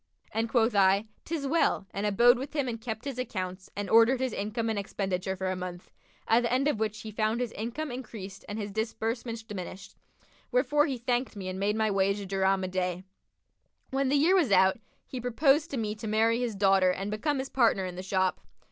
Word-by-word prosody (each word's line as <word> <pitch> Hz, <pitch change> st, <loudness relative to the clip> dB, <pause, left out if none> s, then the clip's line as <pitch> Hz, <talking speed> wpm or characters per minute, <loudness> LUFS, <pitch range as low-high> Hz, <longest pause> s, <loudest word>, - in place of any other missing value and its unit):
and 225 Hz, +1 st, -1 dB
quoth 230 Hz, -1 st, +3 dB
I, 200 Hz, +1 st, +4 dB, 0.2 s
''Tis 315 Hz, -3 st, -3 dB
well,' 295 Hz, -9 st, +2 dB
and 200 Hz, +1 st, -2 dB
abode 240 Hz, +4 st, +5 dB
with 275 Hz, +4 st, -6 dB
him 285 Hz, -3 st, 0 dB
and 230 Hz, -2 st, -4 dB
kept 220 Hz, 0 st, -5 dB
his 270 Hz, -3 st, -4 dB
accounts 185 Hz, -6 st, -4 dB
and 205 Hz, 0 st, -3 dB
ordered 230 Hz, +4 st, +5 dB
his 260 Hz, -3 st, -1 dB
income 215 Hz, +3 st, -2 dB
and 220 Hz, -2 st, 0 dB
expenditure 190 Hz, -1 st, -2 dB
for 185 Hz, 0 st, -2 dB
a -, -, -2 dB
month, 180 Hz, -1 st, -7 dB, 0.4 s
at 230 Hz, +2 st, +5 dB
the 235 Hz, -, -1 dB
end 260 Hz, +3 st, +2 dB
of 295 Hz, -8 st, 0 dB
which 215 Hz, -1 st, -2 dB
he 220 Hz, -, -7 dB
found 215 Hz, +2 st, 0 dB
his 245 Hz, -2 st, -2 dB
income 240 Hz, +8 st, -4 dB
increased 215 Hz, -6 st, -8 dB
and 205 Hz, -, -4 dB
his 205 Hz, -2 st, -4 dB
disbursements 225 Hz, +2 st, -3 dB
diminished; 195 Hz, -2 st, -8 dB, 0.6 s
wherefore 295 Hz, -12 st, +3 dB
he 270 Hz, -3 st, -2 dB
thanked 245 Hz, 0 st, -1 dB
me 195 Hz, -2 st, -6 dB
and 185 Hz, +1 st, -5 dB
made 205 Hz, +2 st, +1 dB
my 220 Hz, -1 st, +1 dB
wage 195 Hz, +1 st, +1 dB
a 200 Hz, -, -6 dB
dirham 195 Hz, 0 st, +1 dB
a -, -, -1 dB
day. 180 Hz, -1 st, -2 dB, 0.9 s
When 270 Hz, 0 st, +1 dB
the 285 Hz, -, +2 dB
year 310 Hz, +6 st, +4 dB
was 325 Hz, -, +3 dB
out, 190 Hz, +2 st, +5 dB, 0.3 s
he 255 Hz, -, -6 dB
proposed 275 Hz, +6 st, +2 dB
to 275 Hz, -, -3 dB
me 215 Hz, -2 st, -1 dB
to 215 Hz, +1 st, -7 dB
marry 225 Hz, +2 st, +2 dB
his 240 Hz, -4 st, -2 dB
daughter 195 Hz, -1 st, +4 dB
and 195 Hz, +3 st, -2 dB
become 275 Hz, +7 st, -1 dB
his 265 Hz, 0 st, -3 dB
partner 225 Hz, -7 st, +2 dB
in 180 Hz, -, -5 dB
the 185 Hz, -, -5 dB
shop. 185 Hz, -1 st, 0 dB
220 Hz, 220 wpm, -29 LUFS, 195-245 Hz, 0.9 s, abode